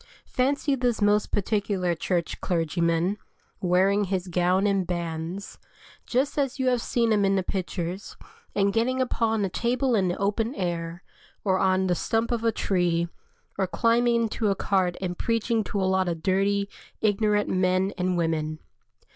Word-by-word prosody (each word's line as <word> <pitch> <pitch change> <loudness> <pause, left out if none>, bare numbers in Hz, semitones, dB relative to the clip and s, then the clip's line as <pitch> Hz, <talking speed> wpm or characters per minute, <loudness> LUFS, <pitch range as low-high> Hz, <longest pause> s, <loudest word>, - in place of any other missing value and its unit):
Fancy 280 +3 +1
this 245 -4 0
most 205 0 +2
particular 195 -3 0
Church 170 0 -2
clergyman, 170 +3 0 0.4
wearing 190 +3 +3
his 190 -1 -2
gown 180 +2 +2
and 195 -3 +1
bands, 170 +2 -4 0.5
just 270 +4 0
as 275 -2 0
you 260 -1 +2
have 245 -2 +1
seen 230 -1 +1
him 205 -1 +2
in 195 0 +3
the 190 - +1
pictures, 185 0 -4 0.4
and 200 -1 +2
getting 250 +4 +1
upon 225 -4 +1
a - - 0
table 245 +5 0
in 195 -4 +2
the 175 - -1
open 215 +6 -1
air, 170 -2 -3 0.4
or 190 -2 +2
on 190 0 +2
the 180 - +2
stump 225 +6 0
of 235 -1 -1
a 230 - +3
tree, 175 -4 0 0.5
or 190 - +2
climbing 235 +3 +2
into 220 0 -1
a 195 - +2
cart 190 -3 +1
and 180 -2 -4
preaching 230 -1 0
to 200 - -2
a 190 - +1
lot 190 0 +2
of 165 -2 -4
dirty, 200 +1 +1 0.4
ignorant 210 0 +2
men 185 +1 +1
and 180 -1 0
women. 155 -2 -1
195 Hz, 165 wpm, -26 LUFS, 180-225 Hz, 0.5 s, wearing